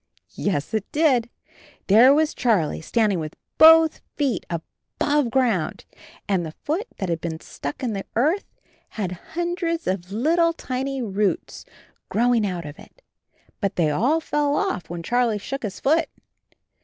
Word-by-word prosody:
Yes, 190 Hz, -1 st, -2 dB
it 215 Hz, -2 st, -2 dB
did. 265 Hz, -7 st, +2 dB, 0.6 s
There 230 Hz, +7 st, +7 dB
was 305 Hz, +2 st, +3 dB
Charlie 205 Hz, -13 st, +1 dB
standing 210 Hz, +1 st, +1 dB
with 155 Hz, -1 st, -6 dB, 0.2 s
both 320 Hz, 0 st, +7 dB
feet 270 Hz, -, -1 dB
above 255 Hz, -, -2 dB
ground 230 Hz, -10 st, 0 dB, 0.4 s
and 190 Hz, -4 st, +1 dB
the 160 Hz, -1 st, -6 dB
foot 355 Hz, +10 st, -2 dB
that 190 Hz, -, -3 dB
had 170 Hz, -2 st, -2 dB
been 160 Hz, -1 st, -4 dB
stuck 145 Hz, -, -7 dB
in 235 Hz, -3 st, -1 dB
the 195 Hz, -1 st, -5 dB
earth 310 Hz, -, +2 dB, 0.5 s
had 195 Hz, -5 st, -2 dB
hundreds 335 Hz, -, -3 dB
of 185 Hz, 0 st, -3 dB
little 335 Hz, +10 st, +2 dB
thin 260 Hz, -6 st, -4 dB
roots 210 Hz, -, -1 dB, 0.4 s
growing 235 Hz, -1 st, +2 dB
out 175 Hz, -3 st, -4 dB
of 145 Hz, 0 st, -9 dB
it. -, -, -17 dB, 0.6 s
But 200 Hz, -2 st, -1 dB
they 160 Hz, -4 st, +2 dB
all 255 Hz, -, +2 dB
fell 295 Hz, -2 st, 0 dB
off 385 Hz, -, -2 dB
when 170 Hz, 0 st, -5 dB
Charlie 240 Hz, +2 st, +1 dB
shook 270 Hz, +7 st, -5 dB
his 200 Hz, -4 st, -5 dB
foot. 315 Hz, +4 st, +2 dB
235 Hz, 150 wpm, -23 LUFS, 185-295 Hz, 0.6 s, There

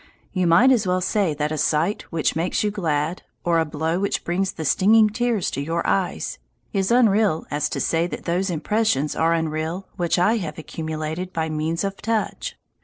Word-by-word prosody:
You 185 Hz, -2 st, +1 dB
might 180 Hz, +11 st, +6 dB
as 220 Hz, -6 st, +2 dB
well 180 Hz, 0 st, +2 dB
say 185 Hz, -3 st, 0 dB
that 150 Hz, +1 st, -1 dB
a 155 Hz, -, -2 dB
sight 160 Hz, +9 st, 0 dB
which 165 Hz, -2 st, 0 dB
makes 165 Hz, +5 st, 0 dB
you 210 Hz, -, +1 dB
glad, 165 Hz, -4 st, -1 dB, 0.2 s
or 170 Hz, -1 st, +2 dB
a 160 Hz, -, +2 dB
blow 160 Hz, +3 st, -1 dB
which 200 Hz, +1 st, -1 dB
brings 190 Hz, +3 st, 0 dB
the 160 Hz, -, -6 dB
stinging 215 Hz, +8 st, +5 dB
tears 235 Hz, -3 st, 0 dB
to 140 Hz, -, -3 dB
your 165 Hz, +3 st, -2 dB
eyes, 190 Hz, -2 st, -1 dB, 0.3 s
is 195 Hz, -2 st, +1 dB
unreal 215 Hz, -7 st, +3 dB
as 150 Hz, 0 st, 0 dB
to -, -, -3 dB
say 165 Hz, +1 st, +1 dB
that -, -, -7 dB
those 180 Hz, +3 st, 0 dB
impressions 175 Hz, -3 st, 0 dB
are 165 Hz, +1 st, +2 dB
unreal 160 Hz, +3 st, -2 dB
which 175 Hz, 0 st, +1 dB
I 210 Hz, +6 st, +3 dB
have 160 Hz, -7 st, -5 dB
accumulated 160 Hz, +3 st, -4 dB
by 160 Hz, -2 st, -2 dB
means 155 Hz, +3 st, -1 dB
of 195 Hz, 0 st, -3 dB
touch. 225 Hz, 0 st, -2 dB
170 Hz, 190 wpm, -23 LUFS, 160-200 Hz, 0.3 s, might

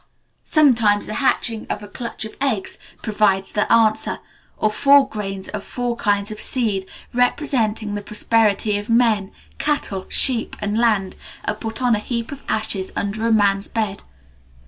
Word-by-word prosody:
Sometimes 230 Hz, -9 st, +4 dB
the 215 Hz, -, -5 dB
hatching 230 Hz, -4 st, +1 dB
of 210 Hz, -, -3 dB
a -, -, -8 dB
clutch 230 Hz, +1 st, -5 dB
of 220 Hz, -, -9 dB
eggs 235 Hz, -9 st, -1 dB, 0.2 s
provides 205 Hz, -3 st, +1 dB
the 210 Hz, -, 0 dB
answer, 220 Hz, -1 st, +3 dB, 0.4 s
or 215 Hz, -, +1 dB
four 280 Hz, +4 st, +5 dB
grains 195 Hz, -2 st, -5 dB
of 210 Hz, -2 st, -5 dB
four 245 Hz, -1 st, -3 dB
kinds 205 Hz, -2 st, 0 dB
of 215 Hz, -, -7 dB
seed, 205 Hz, -7 st, -1 dB, 0.2 s
representing 235 Hz, -4 st, +1 dB
the 205 Hz, -, -3 dB
prosperity 210 Hz, 0 st, +1 dB
of 205 Hz, +3 st, -9 dB
men, 225 Hz, -4 st, +2 dB, 0.3 s
cattle, 245 Hz, -10 st, -2 dB
sheep, 245 Hz, -4 st, +2 dB
and 210 Hz, 0 st, -2 dB
land, 215 Hz, -5 st, +1 dB, 0.3 s
are -, -, 0 dB
put 225 Hz, +3 st, -6 dB
on 245 Hz, -1 st, +4 dB
a -, -, -1 dB
heap 235 Hz, +2 st, -4 dB
of 280 Hz, -1 st, -8 dB
ashes 215 Hz, -3 st, -1 dB
under 215 Hz, +3 st, -2 dB
a -, -, +2 dB
man's 200 Hz, -2 st, +3 dB
bed. 215 Hz, -3 st, -2 dB
215 Hz, 160 wpm, -21 LUFS, 205-235 Hz, 0.4 s, four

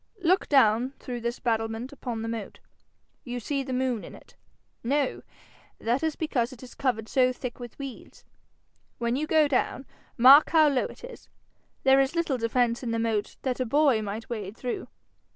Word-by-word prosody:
Look 365 Hz, +3 st, +2 dB
down 250 Hz, -1 st, +4 dB
through 245 Hz, -2 st, -6 dB
this 235 Hz, +1 st, -2 dB
battlement 225 Hz, +2 st, -2 dB
upon 240 Hz, -5 st, -5 dB
the -, -, -3 dB
moat. 225 Hz, -3 st, -5 dB, 0.7 s
You 245 Hz, -1 st, -5 dB
see 275 Hz, +4 st, -2 dB
the 265 Hz, -1 st, -6 dB
moon 255 Hz, -3 st, -1 dB
in -, -, -10 dB
it? -, -, -18 dB, 0.5 s
No? 275 Hz, +3 st, 0 dB, 0.6 s
That 240 Hz, +4 st, 0 dB
is 320 Hz, -1 st, -1 dB
because 260 Hz, -6 st, -1 dB
it 255 Hz, -1 st, -12 dB
is 250 Hz, -, -11 dB
covered 230 Hz, -5 st, -1 dB
so 255 Hz, 0 st, +3 dB
thick 250 Hz, -1 st, -7 dB
with 240 Hz, -2 st, -9 dB
weeds. 275 Hz, -3 st, -9 dB, 0.7 s
When 235 Hz, 0 st, -1 dB
you 305 Hz, +3 st, -2 dB
go 310 Hz, -2 st, +4 dB
down, 270 Hz, 0 st, -1 dB, 0.3 s
mark 265 Hz, +5 st, +8 dB
how 315 Hz, -2 st, +5 dB
low 270 Hz, -3 st, +1 dB
it -, -, -10 dB
is. -, -, -11 dB, 0.5 s
There 270 Hz, 0 st, +6 dB
is 270 Hz, +4 st, +1 dB
little 320 Hz, -7 st, 0 dB
defence 235 Hz, +1 st, +1 dB
in 245 Hz, -, -4 dB
the 230 Hz, -, -1 dB
moat 225 Hz, -2 st, -1 dB
that 255 Hz, -1 st, -1 dB
a -, -, +2 dB
boy 280 Hz, -3 st, +3 dB
might 215 Hz, +2 st, -5 dB
wade 215 Hz, -3 st, -6 dB
through. 250 Hz, -2 st, -4 dB
250 Hz, 185 wpm, -27 LUFS, 230-275 Hz, 0.7 s, mark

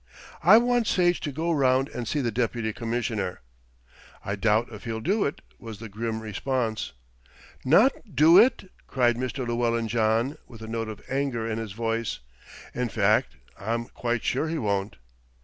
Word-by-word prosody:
"I 195 Hz, +6 st, +8 dB
want 240 Hz, -1 st, +2 dB
Sage 175 Hz, -1 st, +2 dB
to 145 Hz, -, -4 dB
go 160 Hz, +5 st, -1 dB
round 135 Hz, -3 st, +3 dB
and 120 Hz, -2 st, -5 dB
see 145 Hz, +5 st, 0 dB
the 120 Hz, -3 st, -1 dB
Deputy 115 Hz, -1 st, -1 dB
Commissioner." 115 Hz, -5 st, -3 dB, 0.8 s
"I 100 Hz, -, -2 dB
doubt 110 Hz, +3 st, +1 dB
if 105 Hz, -, -10 dB
he'll 115 Hz, -1 st, -3 dB
do 195 Hz, -, +1 dB
it," 140 Hz, -, -3 dB, 0.2 s
was 115 Hz, -3 st, -8 dB
the 115 Hz, +1 st, -9 dB
grim 110 Hz, +2 st, -3 dB
response. 110 Hz, -, -2 dB, 0.7 s
"Not 210 Hz, -, +3 dB
do 165 Hz, +5 st, +7 dB
it!" 220 Hz, -5 st, +3 dB, 0.2 s
cried 120 Hz, -3 st, +2 dB
Mr. 130 Hz, +1 st, -3 dB
Llewellyn 115 Hz, -1 st, 0 dB
John, 115 Hz, +6 st, +1 dB
with 115 Hz, -2 st, -12 dB
a -, -, -7 dB
note 115 Hz, 0 st, -3 dB
of 105 Hz, -1 st, -9 dB
anger 135 Hz, -4 st, -1 dB
in 115 Hz, 0 st, -2 dB
his 110 Hz, -4 st, -6 dB
voice. 115 Hz, 0 st, -2 dB, 0.6 s
"In 125 Hz, -1 st, -2 dB
fact, 105 Hz, -1 st, +2 dB, 0.2 s
I'm 115 Hz, +3 st, -2 dB
quite 120 Hz, -1 st, -3 dB
sure 135 Hz, +5 st, 0 dB
he 165 Hz, +1 st, -2 dB
won't." 100 Hz, -5 st, -1 dB
115 Hz, 165 wpm, -26 LUFS, 110-140 Hz, 0.8 s, I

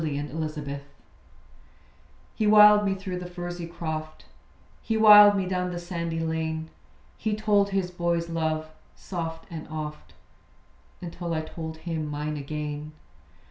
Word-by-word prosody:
THE 155 Hz, -2 st, -2 dB
MANGO 155 Hz, +2 st, -3 dB
TREE 145 Hz, -2 st, -6 dB, 1.5 s
He 215 Hz, -, 0 dB
wiled 210 Hz, 0 st, +8 dB
me 195 Hz, -1 st, +1 dB
through 190 Hz, -2 st, -5 dB
the 180 Hz, -, -6 dB
furzy 175 Hz, -1 st, -6 dB
croft; 155 Hz, -2 st, -6 dB, 0.6 s
He 225 Hz, -, -1 dB
wiled 210 Hz, -1 st, +9 dB
me 190 Hz, -, 0 dB
down 180 Hz, 0 st, -1 dB
the 175 Hz, -, -4 dB
sandy 170 Hz, -2 st, -4 dB
lane. 160 Hz, 0 st, -2 dB, 0.5 s
He 215 Hz, -1 st, -1 dB
told 205 Hz, -2 st, +2 dB
his 195 Hz, -2 st, -1 dB
boy's 170 Hz, -1 st, -1 dB
love, 160 Hz, -1 st, -1 dB, 0.3 s
soft 165 Hz, -3 st, -5 dB
and 160 Hz, -2 st, -7 dB
oft, 150 Hz, -1 st, -7 dB, 0.9 s
Until 170 Hz, -1 st, -4 dB
I 155 Hz, -, 0 dB
told 160 Hz, 0 st, -7 dB
him 160 Hz, -2 st, -4 dB
mine 150 Hz, +1 st, -3 dB
again. 150 Hz, +1 st, -5 dB
165 Hz, 140 wpm, -26 LUFS, 155-185 Hz, 1.5 s, wiled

